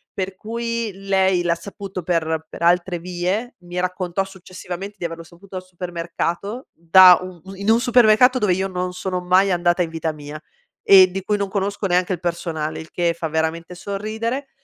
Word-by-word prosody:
per 190 0 -3
cui 230 +2 -3
lei 190 -2 +1
l'ha 170 -1 +1
saputo 195 0 -8
per 160 -2 -1
per - - -11
altre 175 +1 +2
vie. 185 +7 -3
Mi 175 0 -5
raccontò 185 +1 -1
successivamente 190 +1 -8
di 175 - -4
averlo 165 0 -5
saputo 185 +3 -15
al 185 - -5
supermercato, 175 +5 -4
da 180 +2 +7
un 185 -2 -9 0.2
in 200 +2 -2
un 230 - +4
supermercato 245 0 +5
dove 210 -6 +2
io 190 +2 -1
non 180 -1 -3
sono 185 0 -3
mai 185 +2 +3
andata 175 0 +2
in 170 - 0
vita 160 -1 -3
mia 150 0 -9 0.5
e 190 -2 +8
di 190 +1 -5
cui 210 +1 0
non 200 - -1
conosco 200 +1 -2
neanche 180 +1 +1
il 175 - -4
personale 165 -3 -3
il 160 - -10
che 170 -1 0
fa 165 - -2
veramente 160 +2 -2
sorridere. 220 +8 -4
185 Hz, 180 wpm, -21 LUFS, 175-200 Hz, 0.5 s, e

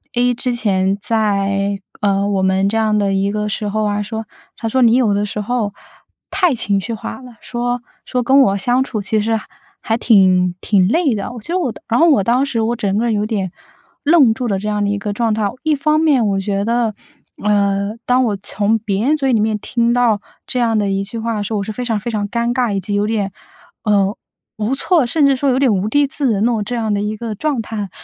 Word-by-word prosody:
：“A 245 0 +3
之 245 +1 -2
前 195 -4 0
在， 200 -2 0 0.2
呃， 200 -1 +1
我 195 -2 0
们 190 +1 +2
这 225 - 0
样 215 -1 +2
的 200 -1 +1
一 195 +1 +1
个 210 0 -2
时 210 0 -3
候 215 +1 -1
啊， 205 0 0
说 220 +2 -5 0.3
他 225 - -4
说 260 +3 +1
你 235 -1 +5
有 230 -5 +3
的 205 +1 0
时 210 +1 -5
候 215 -1 -1 0.6
太 355 -6 +2
情 200 -3 0
绪 230 +5 -4
化 220 - -7
了。” 245 -3 -13
说 245 0 -2 0.2
说 250 -1 -1
跟 265 +3 +5
我 200 -6 +3
相 245 +6 +1
处 220 -6 -4
其 215 +2 0
实 225 +1 0 0.4
还 225 +1 0
挺 185 -6 +4
挺 190 -3 +3
累 285 - +2
的。 200 - -4
我 240 - -8
觉 330 - -5
得 370 - +1
我 270 -9 -1
当 - - -14
然 235 +1 +1
后 335 - +6
我 225 -10 +4
当 245 +6 +2
时， 235 -5 -1
我 235 +2 0
整 200 -2 -1
个 230 - +1
人 235 - +1
有 210 0 0
点 195 -5 -2 0.5
愣 290 -7 +5
住 250 0 -3
了 195 -3 0
这 210 - -5
样 210 -1 0
的 200 - 0
一 205 - 0
个 205 0 -3
状 225 0 0
态。 210 -2 0
一 315 -1 +2
方 305 +2 +1
面 280 -8 +3
我 195 -1 0
觉 200 0 -1
得， 230 -2 0 0.5
呃， 200 0 +1
当 250 +1 +3
我 210 - 0
从 205 +2 0
别 205 0 -1
人 300 +3 +3
嘴 270 -3 +1
里 225 - +3
面， 215 0 +1
听 235 +2 0
到 240 -4 +2 0.3
这 255 - -3
样 230 -2 +2
的 205 -1 +1
一 195 0 0
句 205 +4 -7
话 230 0 -2
的 205 - -2
时 220 - -4
候， 210 - 0
我 - - -2
是 215 - -5
非 245 +4 -5
常 225 -3 0
非 235 +3 -4
常 205 -2 -2
尴 235 +1 0
尬， 240 -3 0
以 195 - 0
及 205 +1 -4
有 205 0 +1
点， 210 -3 -1 0.5
呃， 200 -1 +2 0.4
无 215 +4 -1
措， 325 -1 +2
甚 285 +4 +2
至 275 - +3
说 275 +2 0
有 255 0 +2
点 265 -5 +3
无地自容 225 +2 +1
那 240 - +3
种， 220 -3 -1
这 240 +4 -4
样 220 -3 -1
的 200 - 0
一 210 +1 -2
个 225 -1 -5
状 280 +1 -1
态。 210 -2 -5
220 Hz, 270 characters per minute, -18 LUFS, 205-245 Hz, 0.6 s, 后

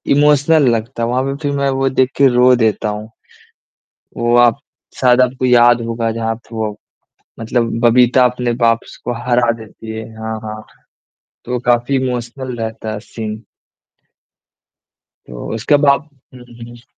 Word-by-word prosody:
Emotional 145 0 +4
लगता 115 +1 -4
है, - - 0
वहाँ 130 +2 0
पे 135 0 -3
फिर 145 -1 -1
मैं 140 0 +1
वो 135 0 0
देख 130 0 +1
के 140 - +5
रो 125 0 +4
देता 110 -2 0
हूँ। 105 +1 -6 1.1
वो 120 0 +1
आप 120 -1 +4 0.4
शायद 125 0 +4
आपको 130 0 0
याद 120 -1 +5
होगा, 115 0 -2
जहाँ 115 0 -2
थ 120 0 -22
वो 110 -2 -3 0.6
मतलब 115 +1 -1
बबीता 125 +2 +4
अपने 125 0 0
बाप 115 0 +3
स - - -12
को 120 - -2
हरा 120 -1 +2
देती 110 0 -11
है। 110 - -6
हाँ, 110 0 -4
हाँ। 110 0 -7 0.8
तो 125 0 -2
काफ़ी 120 +2 +2
इमोशनल 125 0 -3
रहता 110 -1 -5
है 105 - -5
सीन। 110 0 -7 1.9
तो - - -8
उसके 120 +7 +2
बाद 140 +2 +2 0.3
हुँ, 125 - -12
हुँ, 120 0 -14
120 Hz, 155 wpm, -16 LUFS, 115-130 Hz, 1.9 s, के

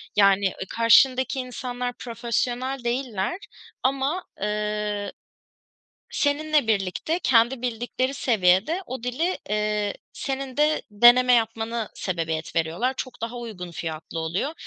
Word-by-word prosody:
Yani, 200 -1 +5
ııı, 190 0 -2
karşındaki 260 +3 +4
insanlar 250 -1 -4
profesyonel 245 +2 -2
değiller 240 - -1 0.5
ama, 275 +7 0 0.2
ııı, 210 0 -2 1.0
seninle 300 -1 +1
birlikte 215 - 0
kendi 240 +1 +3
bildikleri 245 +2 -2
seviyede 220 - +2
o 255 -2 -6
dili, 290 +10 -1
ııı, 210 -1 0 0.2
senin 270 -1 -4
de 300 +1 +2
deneme 240 +4 +6
yapmana 225 -1 0
sebebiyet 165 -3 -3
veriyorlar. 170 +11 0
Çok 255 -4 -6
daha 235 +1 -3
uygun 210 -7 -7
fiyatlı 160 0 -6
oluyor. 170 - -2
235 Hz, 110 wpm, -25 LUFS, 205-260 Hz, 1.0 s, deneme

